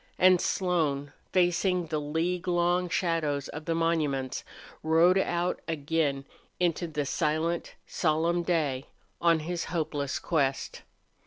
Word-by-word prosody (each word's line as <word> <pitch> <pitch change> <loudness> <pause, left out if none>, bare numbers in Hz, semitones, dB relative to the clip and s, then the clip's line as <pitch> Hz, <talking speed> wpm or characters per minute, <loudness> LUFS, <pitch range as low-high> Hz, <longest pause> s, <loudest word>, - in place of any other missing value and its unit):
And 185 -1 +5
Slone, 150 -6 0 0.2
facing 180 0 +2
the 155 -1 -2
league 170 +5 -1
long 175 0 +2
shadows 160 -6 0
of 155 +1 -7
the 165 - 0
monuments, 150 -6 0 0.4
rode 165 +4 +4
out 175 -1 -1
again 145 -3 -1 0.3
into 175 -1 +1
the 150 -2 -2
silent, 155 +4 -1
solemn 165 +1 +1
day, 155 -7 0 0.3
on 165 -2 +4
his 170 +2 -3
hopeless 150 -5 -2
quest. 140 -5 -1
165 Hz, 115 wpm, -28 LUFS, 150-175 Hz, 0.4 s, And